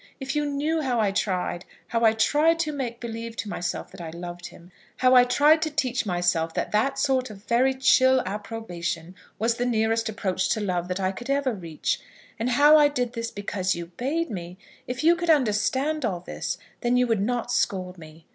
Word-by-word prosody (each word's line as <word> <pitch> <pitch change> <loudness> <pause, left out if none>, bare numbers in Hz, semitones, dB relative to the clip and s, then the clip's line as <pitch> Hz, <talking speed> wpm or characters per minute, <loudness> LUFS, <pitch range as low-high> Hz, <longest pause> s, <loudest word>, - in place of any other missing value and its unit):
If 270 +1 -4
you 295 0 0
knew 300 +3 -1
how 250 -5 0
I 210 -3 +2
tried, 185 -3 -1 0.3
how 230 0 0
I 220 -1 +6
tried 300 +9 +3
to 310 -2 -1
make 250 -5 -4
believe 230 -1 -6
to 220 - -4
myself 180 -3 -4
that 190 - -11
I 165 - -6
loved 175 +1 -7
him; 175 +2 -16 0.3
how 255 0 +4
I 250 -1 +8
tried 295 +5 +4
to 315 - 0
teach 260 -6 -1
myself 175 -3 0
that - - -2
that 270 +6 +1
sort 260 -2 +1
of 205 -2 -12
very 255 +3 +2
chill 260 0 +4
approbation 180 -5 -5 0.2
was 230 +2 0
the 245 - 0
nearest 225 -1 +1
approach 190 -4 -1
to - - -3
love 180 -4 -1
that 180 +1 -3
I 190 -1 0
could 240 +7 -9
ever 275 -2 +1
reach; 170 -6 -3 0.4
and 230 +2 0
how 290 +5 +6
I 295 - +6
did 250 -4 -2
this 230 0 -3
because 195 -3 -2
you 170 0 -7
bade 305 +5 -1
me; 175 -2 -6 0.3
if 250 +3 -4
you 335 +2 +6
could 345 0 -3
understand 270 +3 +2
all 185 -7 -1
this, - - -4 0.2
then 245 0 +1
you 250 - +4
would 225 -4 0
not 240 +3 -1
scold 185 -5 -1
me. 155 0 -14
230 Hz, 205 wpm, -25 LUFS, 185-265 Hz, 0.4 s, I